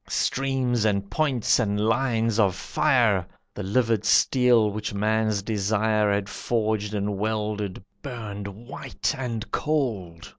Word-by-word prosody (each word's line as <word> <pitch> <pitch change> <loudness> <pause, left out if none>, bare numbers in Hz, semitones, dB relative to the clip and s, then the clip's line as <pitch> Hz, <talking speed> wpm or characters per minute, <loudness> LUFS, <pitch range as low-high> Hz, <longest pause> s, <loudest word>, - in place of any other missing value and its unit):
Streams, 130 -4 0
and 100 -2 0
points, 130 -3 +2
and 105 -3 0
lines 115 0 +1
of 95 -4 +3
fire! 115 - +2 0.3
The - - -6
livid 110 +2 +1
steel, 120 -3 +4
which 105 0 -4
man's 110 -1 +1
desire 110 0 +1
Had 100 0 0
forged 110 -1 -1
and 100 -1 -2
welded, 105 -3 -2 0.2
burned 105 -6 -6
white 120 +6 -4
and 120 -4 -4
cold. 110 - -2
110 Hz, 120 wpm, -25 LUFS, 100-120 Hz, 0.3 s, steel